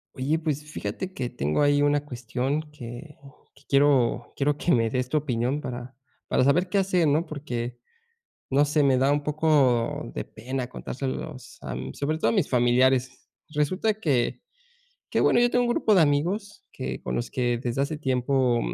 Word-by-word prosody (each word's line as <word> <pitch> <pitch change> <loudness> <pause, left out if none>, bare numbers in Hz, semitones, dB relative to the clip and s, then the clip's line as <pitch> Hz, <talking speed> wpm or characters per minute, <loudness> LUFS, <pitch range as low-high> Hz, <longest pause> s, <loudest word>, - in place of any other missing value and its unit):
Oye, 145 +5 0
pues, 150 -2 -2
fíjate 155 - -5
que 125 -8 -3
tengo 75 - -1
ahí 145 0 +4
una 145 0 +2
cuestión 130 +3 -2
que 145 +2 -9 0.4
que 140 - -23
quiero 135 -4 +3
quiero, 145 +1 +1
que 175 - 0
me 115 -4 +3
des 125 -1 -1
tu 155 - +1
opinión 135 0 -1
para 125 -2 -7 0.3
para - - +2
saber 155 +8 +3
qué 200 - 0
hacer, 185 -4 +2
¿no?, 150 +4 +2
porque, 125 -6 -5 0.7
no 140 +2 +4
sé, 150 +1 +2
me 135 -2 +4
da 135 +2 +3
un 145 0 +1
poco 145 -6 +2
de - - -3
pena 130 +3 -5
contárselos, 130 +2 -6
am, 65 0 -5
sobre 155 +3 -2
todo - - +1
a - - -1
mis 195 -8 +1
familiares, 125 +1 +2 0.2
resulta 160 +8 0
que 145 - 0 0.7
que - - 0
bueno, - - +4
yo 240 0 +4
tengo 245 - +3
un 240 - 0
grupo 220 - +2
de 185 - +6
amigos 175 +8 0
que 65 0 -5
con - - -3
los 120 - -2
que 120 -3 0
desde 120 +2 -2
hace 150 +2 -3
tiempo, 130 -3 +1
140 Hz, 180 wpm, -26 LUFS, 125-155 Hz, 0.7 s, de